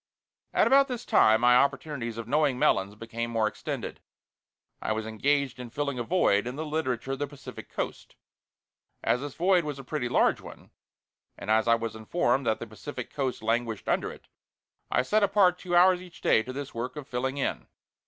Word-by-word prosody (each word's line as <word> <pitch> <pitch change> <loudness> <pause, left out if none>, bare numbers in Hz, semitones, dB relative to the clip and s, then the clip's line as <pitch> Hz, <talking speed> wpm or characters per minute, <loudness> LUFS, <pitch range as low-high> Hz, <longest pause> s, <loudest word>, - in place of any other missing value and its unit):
At - - +3
about 275 +1 +5
this 245 -2 -5
time 110 +1 +5
my 125 0 +6
opportunities 135 -3 0
of 115 -1 -6
knowing 145 -1 +2
Melons 100 -4 +2
became 115 +1 -5
more 115 -2 +1
extended. - - -5 0.8
I 110 - 0
was 110 0 -3
engaged 135 +4 0
in 125 -1 -7
filling 140 0 -3
a - - -1
void 120 - +2
in 125 - -4
the 155 +2 -4
Literature 135 -5 -2
of 135 - -3
the 145 - -1
Pacific 140 -1 -10
Coast. - - -5 0.9
As 125 - +2
this 145 -1 -6
void 180 0 +3
was 150 -2 -4
a 135 - -8
pretty 125 -2 -3
large - - +3
one, - - -13 0.7
and 105 - -3
as 110 +1 +3
I 115 - +6
was 115 -1 -4
informed 120 +2 0
that 110 - +2
the - - -6
Pacific 110 +6 -8
Coast 130 -5 -2
languished 115 -1 -1
under - - 0
it, - - -14 0.6
I 125 - +2
set 215 +11 +2
apart 195 -3 +4
two 175 -2 -2
hours 180 +1 +6
each 180 -1 -13
day - - +4
to 125 - -7
this 140 +1 -6
work 120 +4 -4
of 145 -3 -7
filling 130 +2 -2
in. 140 - -2
130 Hz, 195 wpm, -28 LUFS, 115-150 Hz, 0.9 s, my